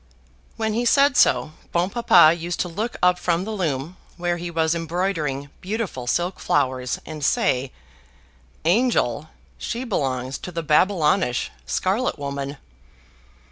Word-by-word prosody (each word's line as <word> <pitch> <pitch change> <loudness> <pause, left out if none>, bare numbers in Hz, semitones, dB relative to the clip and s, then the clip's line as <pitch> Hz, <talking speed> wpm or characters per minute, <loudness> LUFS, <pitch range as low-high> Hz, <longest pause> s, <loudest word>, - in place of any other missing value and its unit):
When 220 -1 -1
he 235 +3 0
said 280 +3 +4
so, 155 - +3 0.2
Bon 175 +1 +1
Papa 180 -9 +6
used 170 +1 -4
to - - -1
look 210 +7 -4
up 180 0 +4
from 175 0 0
the 220 - -5
loom, 165 -4 -2 0.2
where 175 0 -1
he 175 0 -5
was 160 -1 +1
embroidering 165 -5 -2
beautiful 190 - -4
silk 175 +8 -1
flowers, 130 -3 0
and 155 -2 -7
say, 130 -1 +1 0.9
"Angel! 170 - +2 0.3
she 240 +2 -3
belongs 135 - -2
to 180 - -7
the 165 -1 -4
Babylonish 155 -3 +2 0.2
scarlet 200 +5 0
woman." 140 0 -4
170 Hz, 135 wpm, -23 LUFS, 145-195 Hz, 0.9 s, Papa